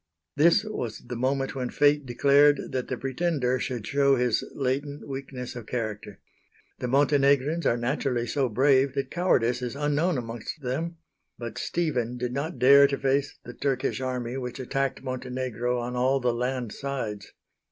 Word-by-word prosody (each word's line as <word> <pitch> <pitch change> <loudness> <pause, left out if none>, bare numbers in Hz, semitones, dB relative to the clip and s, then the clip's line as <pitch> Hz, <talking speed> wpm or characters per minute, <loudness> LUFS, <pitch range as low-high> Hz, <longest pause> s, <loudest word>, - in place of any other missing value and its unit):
This 170 +6 +5
was 125 - -4
the 125 - -3
moment 135 +2 0
when 125 -2 -3
Fate 145 -1 +3
declared 140 +3 +4
that 130 -1 -2
the - - -3
Pretender 135 -2 0
should 120 -3 -3
show 140 +1 +3
his 125 -3 +1
latent 140 +2 -2
weakness 135 -2 -6
of 120 -3 -8
character. 105 -4 -4 0.6
The 125 - -2
Montenegrins 140 +3 +3
are 120 - +2
naturally 125 0 -1
so 130 +2 0
brave 135 +3 +3
that 140 - -2
cowardice 125 -9 +2
is 125 0 -4
unknown 150 +3 +1
amongst 120 +5 -6
them; 160 +7 -3 0.4
but 120 -2 -6
Stephen 125 -8 -1
did 125 0 -3
not 150 +6 -3
dare 140 +2 +7
to 140 0 -2
face 140 +1 0
the 120 - -8
Turkish 135 -1 -1
army, 125 -1 -3
which 125 0 -5
attacked 135 +1 -2
Montenegro 125 -1 -2
on 120 +1 -3
all 130 +2 +2
the 125 -2 +1
land 125 -1 -2
sides. 120 -8 -5
130 Hz, 160 wpm, -26 LUFS, 125-140 Hz, 0.6 s, dare